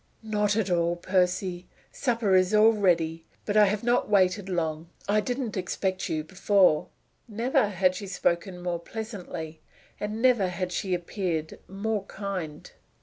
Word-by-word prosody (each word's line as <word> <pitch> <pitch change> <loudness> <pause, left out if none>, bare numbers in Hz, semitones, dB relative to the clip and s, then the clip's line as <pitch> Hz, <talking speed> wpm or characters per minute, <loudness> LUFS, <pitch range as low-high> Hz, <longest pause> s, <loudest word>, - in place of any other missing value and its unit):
"Not 210 -2 +1
at 210 -4 0
all, 170 0 +2
Percy. 180 0 0 0.2
Supper 230 -6 0
is 185 +2 +3
all 220 +2 +6
ready: 165 -5 +1 0.2
but 205 - -2
I 210 -1 +7
have 210 +2 -1
not 240 -1 +2
waited 195 -1 +2
long. 165 -2 -2 0.2
I 210 +1 +3
didn't 245 0 -3
expect 185 0 -2
you 155 -1 -1
before." 185 -1 +3 0.4
Never 230 0 +1
had 185 -2 +2
she 200 +1 -6
spoken 180 -1 -1
more 175 -1 -2
pleasantly, 175 -6 -7 0.4
and 210 +1 -3
never 240 -6 +4
had 180 0 -3
she 185 0 -1
appeared 175 -3 -3
more 205 +1 -2
kind. 190 -7 -6
190 Hz, 145 wpm, -27 LUFS, 175-210 Hz, 0.4 s, I